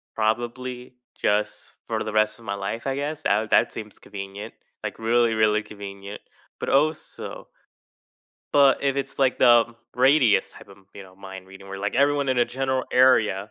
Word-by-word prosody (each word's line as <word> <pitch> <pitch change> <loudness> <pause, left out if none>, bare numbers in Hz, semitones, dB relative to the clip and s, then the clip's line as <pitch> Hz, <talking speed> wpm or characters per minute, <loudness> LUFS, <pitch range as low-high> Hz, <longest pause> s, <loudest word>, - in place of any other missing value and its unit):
probably 120 +3 -3 0.2
just 105 0 -1
for - - -2
the 110 - -5
rest 110 +1 +1
of 115 - -16
my 100 - -2
life, 100 +5 -5
I 135 - -1
guess 145 +2 -4
that 105 +2 +1
that - - +3
seems 105 -2 -8
convenient, 100 0 -8 0.3
like, - - -5
really, 115 0 +2
really 110 -1 +2
convenient, 100 -1 -9 0.4
but - - -3
also 155 +3 -1 1.1
but 140 -2 +5
if 140 -1 +1
it's, 135 -1 -4
like, 135 -2 +2
the 120 -2 +5 0.2
radius 130 -2 +4
type - - -14
of, 100 0 -15 0.2
you 100 - -9
know, 95 -1 -17
mind 95 -1 -10
reading 95 +1 -13
where, 95 0 -6
like, 100 +1 -3
everyone 140 0 +2
in 130 -1 +1
a 120 - +5
general 130 0 -2
area, 110 -6 +3
110 Hz, 175 wpm, -24 LUFS, 100-130 Hz, 1.1 s, but